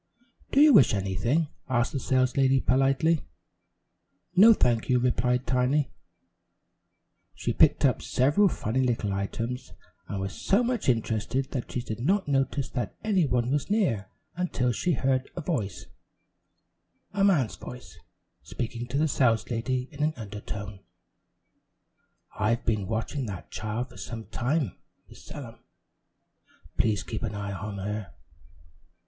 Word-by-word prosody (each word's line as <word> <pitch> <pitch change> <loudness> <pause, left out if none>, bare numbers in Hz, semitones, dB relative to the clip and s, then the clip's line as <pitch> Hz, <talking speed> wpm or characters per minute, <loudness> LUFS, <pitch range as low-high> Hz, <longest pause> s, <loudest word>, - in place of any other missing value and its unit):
"Do 275 - +3
you 300 -1 +8
wish 125 - +6
anything?" 110 - 0 0.2
asked 120 -2 +1
the 140 - -2
saleslady 130 +1 +2
politely. 135 +6 +2 1.1
"No, 210 +5 +9
thank 120 - +2
you," 125 - +4
replied 125 0 +1
Tiny. 125 +3 +1 1.4
She - - -2
picked - - +4
up - - +2
several 145 +11 +3
funny 125 - -1
little 115 -5 0
images, 115 +6 -4 0.3
and 100 - -4
was 95 0 -3
so 205 +5 +2
much 240 - 0
interested 115 +2 0
that 130 -4 -4
she 125 - -2
did 110 -1 -5
not 190 +10 +1
notice 135 -1 0
that 125 - -3
any 195 -7 +2
one 125 -1 0
was 145 +4 0
near 145 - +1 0.3
until 165 -8 0
she 175 +9 0
heard 130 -1 0
a 175 - -4
voice, 115 - -3 1.3
a 200 -1 +1
man's 165 - +3
voice, 125 0 -10 0.4
speaking 120 0 -5
to 130 +3 -3
the 155 - +3
saleslady 125 0 0
in 145 -1 -8
an 155 +1 +1
undertone: 105 -2 -7 1.6
"I've 115 +2 +1
been 105 -4 0
watching 115 +4 -2
that 100 -3 -7
child 110 +4 -3
for 120 - -14
some 115 -2 -6
time, 135 - -1 0.3
Miss - - -15
Sellum; - - -9 1.2
please 105 -3 +1
keep 110 - -5
an 110 -2 -3
eye 100 -1 -4
on 105 +1 -5
her." 100 -4 -5
125 Hz, 135 wpm, -27 LUFS, 110-140 Hz, 1.6 s, No